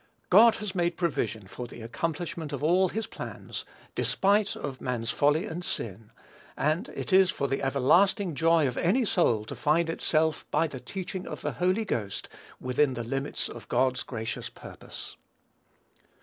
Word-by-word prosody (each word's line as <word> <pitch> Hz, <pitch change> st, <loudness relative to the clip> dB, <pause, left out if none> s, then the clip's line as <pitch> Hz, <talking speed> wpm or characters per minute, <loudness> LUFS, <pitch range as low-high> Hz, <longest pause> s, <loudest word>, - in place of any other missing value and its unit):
God 220 Hz, +4 st, +8 dB
has 210 Hz, -3 st, -4 dB
made 175 Hz, -2 st, 0 dB
provision 115 Hz, -, -1 dB
for 120 Hz, +5 st, -7 dB
the 120 Hz, -1 st, -10 dB
accomplishment 160 Hz, +5 st, -3 dB
of 140 Hz, 0 st, -4 dB
all 180 Hz, +4 st, +4 dB
his 225 Hz, +4 st, -2 dB
plans, -, -, -7 dB, 0.3 s
despite 200 Hz, +1 st, +2 dB
of 135 Hz, -2 st, -6 dB
man's 120 Hz, -2 st, -2 dB
folly 150 Hz, +6 st, +2 dB
and 175 Hz, -4 st, -5 dB
sin; 110 Hz, -, -4 dB, 0.5 s
and 155 Hz, +5 st, 0 dB
it -, -, -3 dB
is 190 Hz, -1 st, +7 dB
for 140 Hz, -, -1 dB
the 135 Hz, -, -1 dB
everlasting 170 Hz, -, +3 dB
joy 165 Hz, +1 st, +4 dB
of 125 Hz, -, -4 dB
any 225 Hz, +9 st, +3 dB
soul 120 Hz, -, +2 dB
to -, -, -6 dB
find 160 Hz, +2 st, +2 dB
itself, 160 Hz, -1 st, +1 dB
by 165 Hz, -, +2 dB
the 140 Hz, -5 st, -6 dB
teaching 185 Hz, +8 st, -5 dB
of -, -, -6 dB
the -, -, -1 dB
Holy 185 Hz, +5 st, +1 dB
Ghost, 105 Hz, -, -3 dB, 0.3 s
within 130 Hz, +1 st, +1 dB
the 120 Hz, -, -3 dB
limits 135 Hz, +4 st, -2 dB
of -, -, -10 dB
God's 130 Hz, -1 st, +2 dB
gracious 110 Hz, -3 st, -4 dB
purpose. -, -, -10 dB
155 Hz, 165 wpm, -28 LUFS, 125-180 Hz, 0.5 s, God